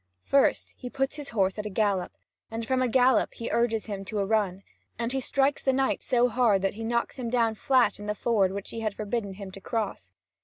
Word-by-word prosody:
First, 275 0 +2
he 250 - -7
puts 270 +3 -2
his 290 -2 -6
horse 195 -2 0
at 210 - -4
a - - -4
gallop, 200 -2 0 0.4
and 225 0 -4
from 260 +2 +1
a 255 - +2
gallop 255 0 +3
he 230 - -5
urges 230 -2 +1
him 200 -3 -5
to 215 +2 -4
a 200 - +1
run, 195 -3 0 0.3
and 235 0 -2
he 270 - 0
strikes 275 +2 +1
the 265 - +2
knight 265 0 +1
so 245 -1 +3
hard 235 -6 +2
that 195 - +1
he 225 +2 -7
knocks 235 +3 -1
him 240 -2 -3
down 230 -2 +2
flat 255 +2 +2
in 205 - -7
the 210 - -1
ford 200 -4 +2
which 200 0 -5
he 230 - -5
had 215 -2 -2
forbidden 210 -1 -3
him 195 -1 -8
to 195 - -11
cross. 200 - -3
225 Hz, 235 wpm, -27 LUFS, 200-250 Hz, 0.4 s, gallop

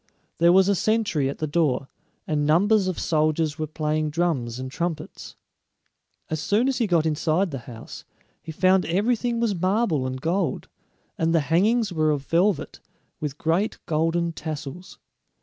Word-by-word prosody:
There 170 +1 +6
was 190 +1 +5
a 200 - +4
sentry 200 -9 +1
at 140 - -5
the 155 - -2
door, 145 -4 0 0.4
and 150 -1 0
numbers 190 +7 +3
of 185 - -2
soldiers 155 -1 0
were 155 - -2
playing 155 0 -1
drums 150 -8 -1
and 130 0 -6
trumpets. 170 +1 -5 0.9
As 155 - -3
soon 210 - +1
as 270 -1 0
he 230 - +1
got 170 -4 +2
inside 160 +4 +1
the 135 - -4
house, 115 -1 -10 0.4
he 160 - -8
found 185 +3 +3
everything 230 +6 0
was 230 -3 +1
marble 185 - 0
and 130 0 -4
gold; 175 +8 -1 0.5
and 165 0 +2
the 165 - +4
hangings 210 +4 +2
were 155 -2 +2
of 145 -2 -1
velvet, 175 +2 0 0.4
with 150 -2 -4
great 170 +8 0
golden 165 +2 0
tassels. 155 +2 -7
165 Hz, 160 wpm, -24 LUFS, 150-190 Hz, 0.9 s, There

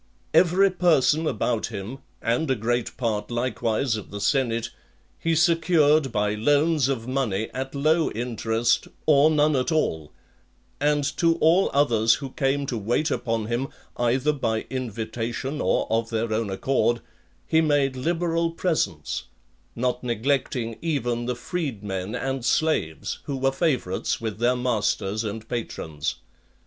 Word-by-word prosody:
Every 185 +2 +5
person 160 -3 +3
about 115 -6 0
him, 110 +7 -6 0.2
and 120 +7 0
a 130 - +3
great 120 +1 -2
part 110 -4 -1
likewise 120 0 0
of 105 - -7
the 100 - -6
senate, 115 -1 0 0.5
he 165 0 +1
secured 160 -4 +3
by 105 -1 0
loans 145 +5 +2
of 125 -4 -2
money 115 -6 -1
at 135 +2 -4
low 155 +3 +2
interest, 115 0 0 0.2
or 150 0 +6
none 150 -1 +3
at 130 +4 0
all; 80 - 0 0.7
and 145 0 +2
to 165 -1 +3
all 170 +3 +4
others 115 -6 +3
who 135 -3 -7
came 140 +1 0
to 120 -4 -3
wait 120 +9 0
upon 115 -3 -1
him, 120 +4 -1 0.3
either 125 +5 +1
by 110 -6 -1
invitation 120 +3 -3
or - - +1
of 115 0 +1
their 115 -1 -1
own 110 -1 -1
accord, 120 +3 +1 0.4
he 160 - +3
made 145 -4 +2
liberal 165 +4 0
presents; 160 - -1 0.5
not 125 +1 -1
neglecting 120 -1 -1
even 120 -7 -1
the 125 - -1
freed 130 - -4
men 95 0 -4
and 135 -2 -2
slaves, 125 - 0
who 140 - -3
were 135 +1 +2
favourites 135 - 0
with 110 -2 -4
their 120 +2 +3
masters 110 -3 0
and 110 +1 -5
patrons. 80 -10 -4
125 Hz, 140 wpm, -25 LUFS, 115-150 Hz, 0.7 s, or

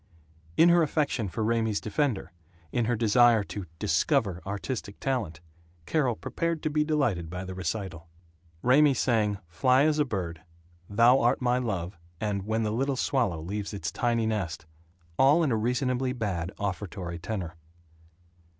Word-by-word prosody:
In 170 - +7
her 175 0 +5
affection 145 -7 0
for 110 - -3
Raymie's 110 -2 +1
defender, 115 -1 -1 0.4
in 120 - 0
her 120 +1 +1
desire 115 0 +4
to 100 -2 -7
"discover 100 - +1
artistic 100 +1 -4
talent," 110 -13 -2 0.4
Carol 130 - +1
prepared 165 +6 -3
to 155 - 0
be 150 0 +2
delighted 135 - 0
by 90 +2 -5
the 95 - -6
recital. 90 -2 -4 0.6
Raymie 140 +3 +5
sang 110 -5 +1
"Fly 130 +11 +3
as 155 -1 +2
a - - +5
Bird," 90 - -4 0.5
"Thou 115 +5 +5
Art 120 - +2
My 125 0 +1
Dove," 95 -7 -3 0.2
and 100 -2 -2
"When 110 +1 0
the 105 - 0
Little 135 +4 0
Swallow 120 - 0
Leaves 100 +5 -4
Its 100 - -3
Tiny 115 -2 0
Nest," 95 -8 -2 0.5
all 145 +5 +5
in 145 - +1
a - - +2
reasonably 125 +3 0
bad 95 -7 -3
offertory 90 -3 -4
tenor. 90 -2 -4
110 Hz, 150 wpm, -28 LUFS, 95-130 Hz, 0.6 s, In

